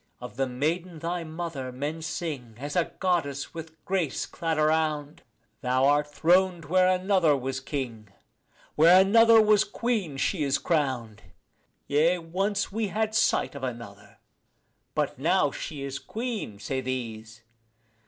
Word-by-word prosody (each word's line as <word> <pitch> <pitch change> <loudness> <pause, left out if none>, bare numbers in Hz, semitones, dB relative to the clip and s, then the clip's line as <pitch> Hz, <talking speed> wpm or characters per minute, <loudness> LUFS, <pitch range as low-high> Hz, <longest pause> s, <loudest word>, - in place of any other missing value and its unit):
Of 125 0 -9
the 135 +1 0
maiden 160 +7 -2
thy 170 +2 -3
mother 160 -5 -5
men 145 +5 -4
sing 145 -8 -5
as 145 +3 -6
a 175 -2 +1
goddess 165 -7 -1
with 160 -1 -9
grace 180 -7 -1
clad 165 -2 -3
around; 155 -1 0 0.4
Thou 130 +1 +2
art 145 +1 +3
throned 175 +2 +2
where 185 +4 +3
another 185 -5 +3
was 130 0 -3
king; 125 -6 -5 0.6
where 170 +4 +7
another 225 +4 +6
was 215 -1 +5
queen 210 - -2
she 165 +4 0
is 140 -2 +2
crowned. 130 - -1 0.6
Yea, 160 +5 +3
once 195 +5 -2
we 220 +1 -1
had 215 +3 -1
sight 220 - +2
of 140 -2 -9
another: 105 -5 -7 0.8
but - - -1
now - - +2
she 145 -3 -6
is 135 0 -4
queen, 225 - -5
say 130 +6 -3
these. 110 -4 -5
155 Hz, 140 wpm, -27 LUFS, 130-185 Hz, 0.8 s, where